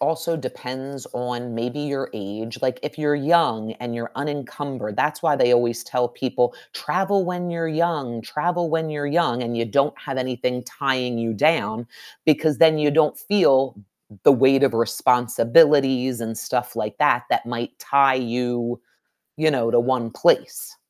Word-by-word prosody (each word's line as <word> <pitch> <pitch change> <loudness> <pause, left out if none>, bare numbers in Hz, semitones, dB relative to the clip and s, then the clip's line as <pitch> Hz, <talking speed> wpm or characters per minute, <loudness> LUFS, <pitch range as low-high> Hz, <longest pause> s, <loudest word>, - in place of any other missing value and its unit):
also 165 +1 -1
depends 130 -1 -7
on, 125 -1 -5
maybe, 120 +5 -4
your 140 -2 -3
age. 110 +2 -7
Like, 130 -1 0
if 150 - -6
you're 145 -1 +1
young 140 -8 +2
and 120 -1 -5
you're 115 0 -6
unencumbered, 140 -5 -5
that's 150 0 0
why 145 - +2
they 125 -2 +3
always 120 -1 +2
tell 125 -1 -1
people, 125 0 -1 0.2
"Travel 195 +1 0
when 180 0 -3
you're 165 -1 -2
young, 155 -8 -1
travel 170 +5 -2
when 160 -1 0
you're 145 -1 -3
young," 145 -6 +1
and 120 0 -4
you 115 - 0
don't 140 +6 +1
have 135 -2 -6
anything 125 -1 -2
tying 130 -3 -2
you 115 -1 -2
down 120 -5 +1 0.4
because 155 -1 +2
then 160 -1 +6
you 150 -1 +2
don't 150 0 +2
feel 135 - +3
m 105 - -19 0.3
m 100 - -19
the - - +9
weight 135 +1 +4
of 135 - +2
responsibilities 125 +3 +3
and 115 -1 -5
stuff 125 -1 -3
like 105 0 -3
that, 145 -5 +3
that - - +1
might 120 0 -5
tie 140 -1 +3 0.2
you, 120 -1 -2 0.6
you 155 0 +2
know, 120 -5 0
to - - +3
1 120 -2 -1
place. - - 0
130 Hz, 170 wpm, -22 LUFS, 120-150 Hz, 0.6 s, the